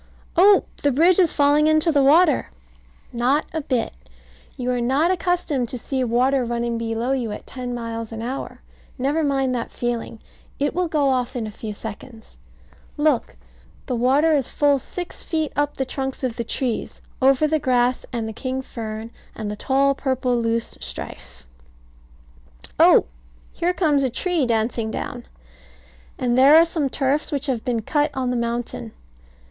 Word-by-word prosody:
Oh, 390 +3 +6 0.2
the 285 - +2
bridge 335 +8 +4
is 350 -4 +5
falling 290 +1 +3
into 310 +2 +3
the 285 -2 +3
water! 300 +2 +4 0.6
Not 255 +5 +1
a 320 - -1
bit. 255 -4 -1 0.6
You 250 0 -1
are 245 -1 -1
not 275 +8 +2
accustomed 345 -9 0
to 250 - -3
see 260 +2 -2
water 250 +3 +2
running 235 0 -2
below 230 +2 -2
you 250 -5 -1
at - - -7
ten 250 -2 -5
miles 230 -1 -5
an 225 0 -6
hour. 260 +3 -5 0.3
Never 285 +5 0
mind 270 -3 +1
that 235 -2 -3
feeling. 235 -2 -3 0.4
It 285 +1 0
will 360 0 0
go 295 -4 +1
off 255 0 -1
in 235 -3 -2
a 215 - -6
few 210 0 -7
seconds. 225 +2 -10 0.6
Look; 295 -4 +1 0.5
the 255 - -2
water 275 +7 +3
is 275 -4 0
full 285 -2 +2
six 355 +7 -6
feet 315 -3 -2
up 290 0 -1
the 265 - -1
trunks 265 0 -4
of 250 -3 -1
the 235 - -3
trees; 240 0 -3 0.2
over 270 +3 +4
the 310 +1 +1
grass 250 -2 +1
and 230 -2 -3
the 220 - -5
king 260 +3 -4
fern, 220 -2 -6 0.2
and 215 -2 -4
the - - -4
tall 275 +5 +2
purple 260 -2 -1
loose 230 -1 -1
strife - - -8 1.3
Oh! - - +7 0.5
Here 350 - 0
comes 300 -6 +2
a 265 - +1
tree 330 +1 0
dancing 225 0 0
down! 140 - -5 0.9
And 245 -1 0
there 270 +4 +7
are 330 +1 +8
some 315 -4 -1
turfs 275 +2 0
which 285 -1 -2
have 255 -6 -1
been 235 -4 -1
cut 295 +5 +1
on 255 -2 -1
the - - -1
mountain. 235 - -3
260 Hz, 170 wpm, -22 LUFS, 235-290 Hz, 1.3 s, are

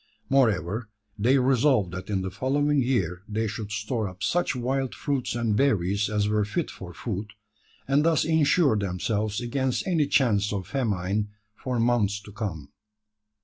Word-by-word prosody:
Moreover, 110 -4 +2 0.3
they 125 +6 +4
resolved 130 -6 +3
that 95 +2 -7
in 95 -2 0
the 95 - -4
following 145 +4 +1
year 95 -9 0
they 110 +1 -1
should 105 -1 -5
store 105 0 -2
up 90 0 -10
such 175 -5 +1
wild 130 +1 -1
fruits 140 -5 -2
and 115 -3 0
berries 100 -5 +2
as 105 -1 +1
were 105 0 +2
fit 155 +11 -2
for 90 -2 -9
food; 100 +2 -5 0.5
and 140 +2 +3
thus 165 -1 +3
insure 155 -3 +3
themselves 105 +2 -1
against 130 +1 -1
any 165 -6 +2
chance 105 -8 +2
of 100 -3 -3
famine 105 -2 -1 0.2
for 125 +2 -3
months 115 -4 +2
to 105 - -12
come. 100 -9 -5
110 Hz, 155 wpm, -26 LUFS, 100-135 Hz, 0.5 s, they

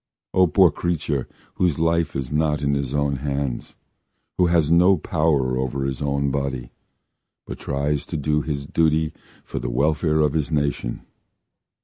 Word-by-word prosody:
O 95 -1 +5
poor 80 - +5
creature! 80 -6 -2 0.3
Whose 85 -6 +2
life 80 0 +1
is 65 -1 -3
not 75 -1 +1
in 70 0 +1
his 70 -2 -1
own 70 -1 0
hands, 70 -2 -3 0.6
Who 90 - +5
has 85 -3 +2
no 90 +3 +5
power 75 -5 +1
over 65 +1 -2
his 65 0 -3
own 70 -1 0
body, 65 -3 -3 0.7
But - - -7
tries 70 +1 -2
to - - -3
do 75 +1 +1
his 70 -2 -4
duty 80 +1 +1 0.3
For - - -5
the - - -3
welfare 75 +4 +1
of 75 -2 +2
his 80 0 -1
nation. 70 -5 -1
75 Hz, 155 wpm, -23 LUFS, 70-80 Hz, 0.7 s, O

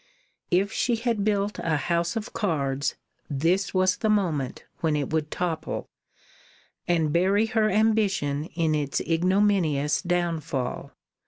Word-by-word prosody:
If 195 +3 +2
she 240 - +1
had 230 -2 -1
built 205 0 0
a 160 -2 0
house 170 - 0
of 220 -2 -4
cards, 140 -8 -1 0.3
this 165 +7 +1
was 185 0 +2
the 220 - 0
moment 170 -11 0
when 160 -2 +1
it 145 0 -2
would 155 -1 0
topple, 165 -2 -3 1.0
and 160 -4 +1
bury 195 +5 +3
her 220 -1 +1
ambition 195 -9 +1
in 165 -2 +1
its 145 -2 0
ignominious 170 -4 +2
downfall. 170 -7 -2
175 Hz, 130 wpm, -26 LUFS, 155-205 Hz, 1.0 s, bury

